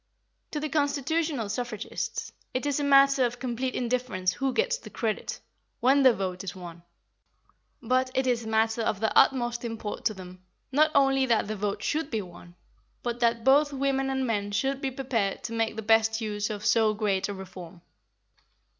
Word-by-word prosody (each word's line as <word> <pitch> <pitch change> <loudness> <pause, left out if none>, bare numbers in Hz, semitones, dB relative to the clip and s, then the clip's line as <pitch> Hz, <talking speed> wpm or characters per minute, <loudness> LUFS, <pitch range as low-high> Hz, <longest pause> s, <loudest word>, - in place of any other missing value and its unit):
To 300 - -3
the 305 - -2
constitutional 290 -3 0
suffragists, 240 0 -4 0.2
it 255 - -1
is 285 0 0
a - - -1
matter 275 -1 +5
of 245 0 -1
complete 255 0 -3
indifference 235 -7 -1
who 270 -1 -1
gets 485 - 0
the - - -11
credit, 220 -2 -3 0.4
when 270 +3 +4
the 260 -2 +7
vote 190 -4 -3
is 185 -1 -5
won; 175 -2 -9 1.0
but 255 +2 +1
it 265 0 +1
is 245 -2 +1
a - - -8
matter 220 +1 +1
of 215 -3 -1
the 220 0 -1
utmost 240 -2 +3
import 225 -2 -5
to 215 - +1
them, 185 -1 -11 0.3
not 305 +3 +4
only 270 -1 +4
that 225 -4 +2
the 215 - -3
vote 205 +1 -3
should 305 +3 -1
be 220 -6 -2
won, 175 -1 -14 0.5
but 240 0 -3
that 230 -1 +1
both 290 +3 +5
women 270 -1 0
and 265 -1 -1
men 205 -4 -1
should 270 +6 -1
be 270 - -1
prepared 250 -7 -2
to 230 - -5
make 225 -1 0
the 220 - -5
best 225 +1 +3
use 210 -2 -2
of 210 -1 -5
so 220 -2 +3
great 205 -2 0
a - - -3
reform. 180 -2 -10
235 Hz, 185 wpm, -27 LUFS, 210-270 Hz, 1.0 s, the